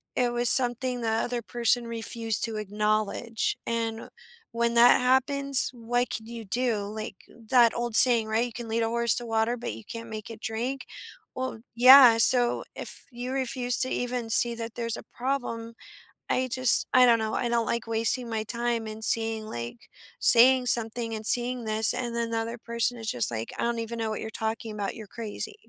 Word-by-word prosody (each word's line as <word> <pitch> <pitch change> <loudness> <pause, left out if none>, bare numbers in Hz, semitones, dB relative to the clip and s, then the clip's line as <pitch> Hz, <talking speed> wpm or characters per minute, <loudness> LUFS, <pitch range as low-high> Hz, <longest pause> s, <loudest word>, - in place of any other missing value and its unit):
it 245 -1 +1
was 240 0 +3
something 250 0 +2
the 225 - -1
other 240 +2 -1
person 240 +1 0
refused 225 -1 -2
to 225 -2 -5
acknowledge, 215 +2 -2
and 230 -1 -3 0.4
when 235 0 -1
that 235 +1 +6
happens, 270 +2 +2
what 245 +1 -2
could 220 0 -6
you 230 -1 -8
do? 230 0 -1
Like, 215 -1 -7 0.3
that 240 -3 +5
old 240 -1 -3
saying, 235 -3 +4
right, 220 +2 0
"You 240 - -8
can 235 0 -8
lead 230 +1 0
a - - 0
horse 235 -1 +1
to 240 - -3
water, 225 +1 0
but 230 - -5
you 110 +1 -11
can't 230 0 -8
make 215 0 -7
it 225 -1 -9
drink." 245 +4 -4 0.5
Well 260 -3 -4 0.2
Yeah, 250 -1 +8
so, 240 +1 +3
if - - -6
you 245 +2 -6
refuse 255 -2 0
to 260 - 0
even 245 -2 -3
see 235 +1 +3
that 230 0 -7
there's 230 -1 -2
a - - -10
problem, 240 -3 -4 0.6
I 255 0 0
just 255 -1 +4
I 255 0 +7
don't 235 -1 +5
know. 220 0 -3
I 240 - -1
don't 235 -1 0
like 235 -1 -3
wasting 230 +2 0
my 220 -1 -2
time 235 0 -2
and 215 0 -8
seeing, 225 -1 0
like 120 - -7 0.4
saying 250 +1 +5
something 230 -1 0
and 215 0 -7
seeing 245 +1 +1
this, 220 0 +2
and 240 -2 -4
then 235 0 -2
the 230 - -1
other 230 +1 -5
person 235 +1 -2
is 225 -1 -4
just 120 -1 +1
like, 115 0 -5
"I - - -2
don't 235 0 -1
even 230 +1 -5
know 225 -1 -2
what 215 - -5
you're 220 - -5
talking 220 0 -4
about. 200 -2 -4
You're 220 -2 -10
crazy," 225 - -6
230 Hz, 200 wpm, -26 LUFS, 220-245 Hz, 0.6 s, Yeah